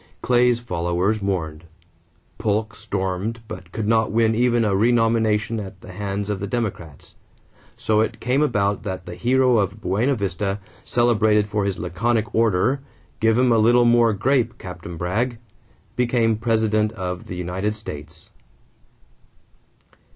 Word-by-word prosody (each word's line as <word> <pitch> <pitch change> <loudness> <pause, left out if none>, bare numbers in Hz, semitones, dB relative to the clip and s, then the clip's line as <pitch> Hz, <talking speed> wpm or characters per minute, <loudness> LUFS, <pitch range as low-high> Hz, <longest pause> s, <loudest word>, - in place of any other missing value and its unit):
Clay's 125 -1 +3
followers 90 0 -1
mourned. 85 -5 -3 0.8
Polk 110 +1 -1
stormed 95 +4 -3
but 90 -4 -9
could 110 +1 -3
not 110 -1 +2
win 110 0 +3
even 120 0 +2
a 100 -2 +1
renomination 115 0 +2
at 95 -2 -8
the 90 - -11
hands 100 +1 -3
of 100 - -3
the 100 - -4
Democrats. 95 - -5 0.6
So 110 -1 +1
it 110 - -2
came 125 +4 +1
about 105 -8 +1
that 95 -3 -5
the 90 - -7
hero 125 +5 +3
of 100 +1 -1
Buena 110 +7 +1
Vista, 100 -1 -2 0.2
celebrated 110 -3 +2
for 105 -1 -1
his 100 -2 -1
laconic 110 +5 -1
order, 115 +4 +2 0.4
"Give 110 0 +3
'em 125 0 +3
a 115 - +4
little 120 +2 +5
more 120 -1 +5
grape, 120 +3 +1
Captain 85 -2 -8
Bragg," 110 +9 -1 0.6
became 120 -2 +2
President 110 -1 +1
of 90 -4 -5
the 90 - -6
United 90 +4 -2
States. 80 -5 -9
105 Hz, 140 wpm, -22 LUFS, 95-115 Hz, 0.8 s, little